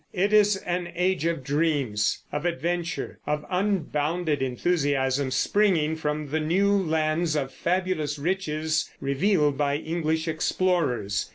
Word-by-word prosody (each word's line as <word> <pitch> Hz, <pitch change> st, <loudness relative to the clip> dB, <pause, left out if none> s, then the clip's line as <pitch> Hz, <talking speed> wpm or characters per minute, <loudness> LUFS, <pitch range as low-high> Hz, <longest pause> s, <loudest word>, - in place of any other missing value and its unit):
It 200 Hz, +3 st, +1 dB
is 210 Hz, -1 st, +5 dB
an 175 Hz, -1 st, -3 dB
age 180 Hz, -1 st, +1 dB
of 165 Hz, -5 st, -2 dB
dreams, 140 Hz, -7 st, 0 dB
of 150 Hz, +1 st, -3 dB
adventure, 170 Hz, +1 st, -2 dB
of 150 Hz, 0 st, -1 dB
unbounded 170 Hz, -5 st, 0 dB
enthusiasm 135 Hz, -1 st, 0 dB
springing 165 Hz, 0 st, +2 dB
from 150 Hz, -1 st, -3 dB
the 160 Hz, -, +1 dB
new 185 Hz, +6 st, +2 dB
lands 160 Hz, -2 st, +1 dB
of 135 Hz, -3 st, -2 dB
fabulous 175 Hz, -5 st, -1 dB
riches 160 Hz, -1 st, -1 dB
revealed 145 Hz, 0 st, +1 dB
by 140 Hz, -1 st, +1 dB
English 160 Hz, 0 st, -2 dB
explorers. 155 Hz, -, 0 dB
160 Hz, 120 wpm, -26 LUFS, 145-180 Hz, -, is